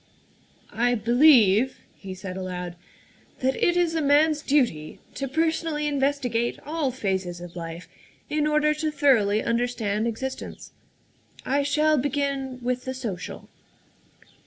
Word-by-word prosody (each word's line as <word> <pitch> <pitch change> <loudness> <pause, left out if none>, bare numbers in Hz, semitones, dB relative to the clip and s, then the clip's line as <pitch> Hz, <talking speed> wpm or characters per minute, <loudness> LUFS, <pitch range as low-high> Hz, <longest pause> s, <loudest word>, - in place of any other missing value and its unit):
" - - -28 0.2
I 245 - +2
believe," 240 -1 +4
he 190 -2 -8
said 185 0 -7
aloud, 180 -2 -5 0.3
" - - -31
that 265 +1 +1
it 350 0 +3
is 345 -2 +2
a 325 - 0
man's 300 +1 +3
duty 240 - 0 0.2
to 275 - -4
personally 320 +1 0
investigate 270 -5 0
all 310 -2 -1
phases 190 -7 -2
of 175 0 -10
life 165 0 -7 0.4
in 300 0 0
order 300 0 +3
to 310 +1 -2
thoroughly 250 -9 +3
understand 230 -3 -1
existence. 260 +4 -6 0.7
I 280 +2 +1
shall 300 +1 +2
begin 275 -1 -2
with 250 +1 -2
the 260 0 -4
social. 220 -9 -6
260 Hz, 135 wpm, -25 LUFS, 210-295 Hz, 0.7 s, believe